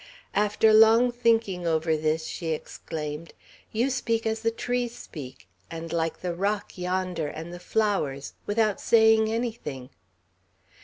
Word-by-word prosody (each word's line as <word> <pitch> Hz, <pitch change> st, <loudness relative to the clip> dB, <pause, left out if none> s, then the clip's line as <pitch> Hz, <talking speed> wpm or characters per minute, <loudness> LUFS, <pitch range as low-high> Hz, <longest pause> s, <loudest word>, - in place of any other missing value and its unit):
After 210 Hz, +2 st, +3 dB
long 225 Hz, +3 st, +6 dB
thinking 225 Hz, -7 st, +1 dB
over 160 Hz, 0 st, +2 dB
this, 155 Hz, +1 st, 0 dB
she 170 Hz, -, -5 dB
exclaimed, 155 Hz, 0 st, -5 dB, 0.4 s
"You 240 Hz, +5 st, +1 dB
speak 230 Hz, -3 st, -1 dB
as 220 Hz, 0 st, -1 dB
the 230 Hz, -, +2 dB
trees 245 Hz, +1 st, -2 dB
speak, 135 Hz, -5 st, -10 dB, 0.2 s
and 165 Hz, 0 st, -6 dB
like 165 Hz, -1 st, -1 dB
the 180 Hz, -1 st, -2 dB
rock 200 Hz, +3 st, -2 dB
yonder, 180 Hz, -3 st, -2 dB
and 165 Hz, +3 st, -7 dB
the 175 Hz, -, -8 dB
flowers, 180 Hz, -11 st, -1 dB
without 215 Hz, -1 st, +1 dB
saying 220 Hz, -1 st, +5 dB
anything!" 220 Hz, -, -4 dB
195 Hz, 135 wpm, -26 LUFS, 160-225 Hz, 0.4 s, long